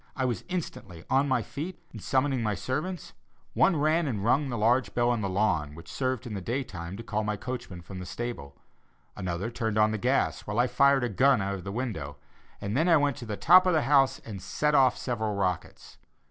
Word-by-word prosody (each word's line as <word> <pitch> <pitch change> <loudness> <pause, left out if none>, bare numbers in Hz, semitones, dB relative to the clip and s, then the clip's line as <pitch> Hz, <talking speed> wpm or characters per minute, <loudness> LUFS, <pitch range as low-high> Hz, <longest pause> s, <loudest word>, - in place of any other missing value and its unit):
I 130 - -1
was 120 -3 -2
instantly 100 - -5
on 135 +2 +3
my 130 -4 +1
feet 170 - -6
and 110 - -9
summoning 130 +1 +1
my 105 -2 0
servants, 165 - -4 0.4
one 190 - +4
ran 155 +2 +2
and 105 -7 -2
rung 135 +4 +2
the 120 - -3
large 120 +4 +2
bell 120 0 +3
on 120 -2 0
the 100 - -1
lawn 85 -7 0
which 85 +1 -11
served 130 -2 -2
in 115 - -6
the 100 - -4
day 125 +8 -2
time 85 -4 -7
to 115 - -7
call 110 -1 -2
my 105 0 -1
coachman 120 -8 -6
from 95 +1 -8
the 90 - -6
stable, 90 -13 -6 0.6
another 90 +5 -3
turned 115 -3 -2
on 110 0 +4
the 110 - -2
gas, 130 +5 0
while 105 +1 -3
I 120 - +4
fired 135 +2 +3
a - - +1
gun 130 +5 +4
out 100 0 -2
of 95 -3 -6
the 100 - -5
window 100 - -4 0.4
and 100 - -4
I - - +4
then 165 -2 +5
went 145 -2 +1
to 120 - -8
the 105 -1 -4
top 185 - +6
of 180 - +3
the 155 - +2
house 135 -2 +4
and 100 -5 -7
set 150 +8 0
off 130 -3 +4
several 110 -4 -2
rockets. 95 -2 -3
120 Hz, 230 wpm, -28 LUFS, 100-135 Hz, 0.6 s, top